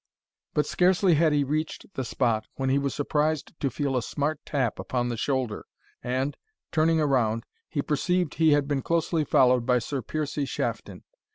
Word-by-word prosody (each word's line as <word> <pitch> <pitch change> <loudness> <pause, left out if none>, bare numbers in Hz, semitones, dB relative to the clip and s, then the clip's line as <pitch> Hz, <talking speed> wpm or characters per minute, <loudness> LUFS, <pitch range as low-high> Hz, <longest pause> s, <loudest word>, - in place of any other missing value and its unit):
But 150 - +2
scarcely 185 0 +3
had 160 0 +4
he 145 -1 +3
reached 155 +6 -3
the 130 - -3
spot, 115 -3 0
when 135 0 0
he 140 - +3
was 140 -1 -2
surprised 150 +1 0
to 140 - 0
feel 140 -1 -2
a 125 - +2
smart 145 +5 -2
tap 130 -6 -1
upon 125 -1 -1
the 120 - -2
shoulder, 130 -2 -2 0.4
and, 130 +3 -1 0.4
turning 160 0 +3
around, 120 -7 +1 0.3
he 145 - -1
perceived 175 +3 0
he 160 -1 +4
had 145 -1 +2
been 145 -2 0
closely 165 0 0
followed 125 -3 +4
by 125 +1 +3
Sir 130 +3 -3
Piercie 150 +2 -2
Shafton. 115 -7 -4
140 Hz, 175 wpm, -26 LUFS, 125-155 Hz, 0.4 s, had